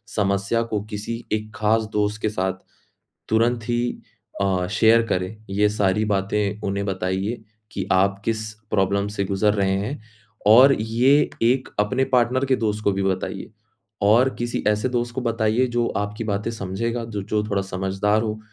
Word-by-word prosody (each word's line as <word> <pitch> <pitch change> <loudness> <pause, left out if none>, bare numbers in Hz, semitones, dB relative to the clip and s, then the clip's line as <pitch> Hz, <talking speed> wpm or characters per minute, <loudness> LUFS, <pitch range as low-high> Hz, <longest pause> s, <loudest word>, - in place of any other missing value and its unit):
समस्या 100 +2 +1
को 110 -3 -2
किसी 110 +3 -5
एक 110 0 -2
ख़ास 110 +1 +2
दोस्त 105 0 0
के 110 - +1
साथ 95 -2 -1 0.8
तुरंत 115 +1 +1
ही 120 0 +1 0.6
अ, 95 -2 +1
शेयर 110 +2 +5
करें, 105 +4 -3
ये 105 +2 +3
सारी 105 0 +1
बातें 105 0 -1
उन्हें 100 0 -2
बताइए 95 +4 -2 0.3
कि - - -3
आप 100 +1 +2
किस 110 -1 -1 0.3
प्रॉब्लम 100 0 +1
से 100 -1 -2
गुज़र 100 +2 +1
रहे 100 -2 +1
हैं 110 +8 -4 0.5
और 125 +6 +8
ये 125 +7 +3
एक 125 +3 +2
अपने 125 +6 +1
पार्टनर 125 +2 +3
के 130 -1 +2
दोस्त 105 -1 -2
को 100 - +3
भी 95 0 -1
बताइए 95 -1 -2 0.6
और 120 +5 +5
किसी 120 0 -2
ऐसे 105 +4 +1
दोस्त 120 -1 -2
को 130 - -2
बताइए, 115 +1 +1
जो 120 -1 0
आपकी 105 +2 -3
बातें 105 +1 -2
समझेगा, 115 +3 -3
जो 105 -3 -5
जो 105 +2 -1
थोड़ा 100 -1 +1
समझदार 95 +3 0
हो, 110 -1 -3
105 Hz, 165 wpm, -23 LUFS, 100-115 Hz, 0.8 s, और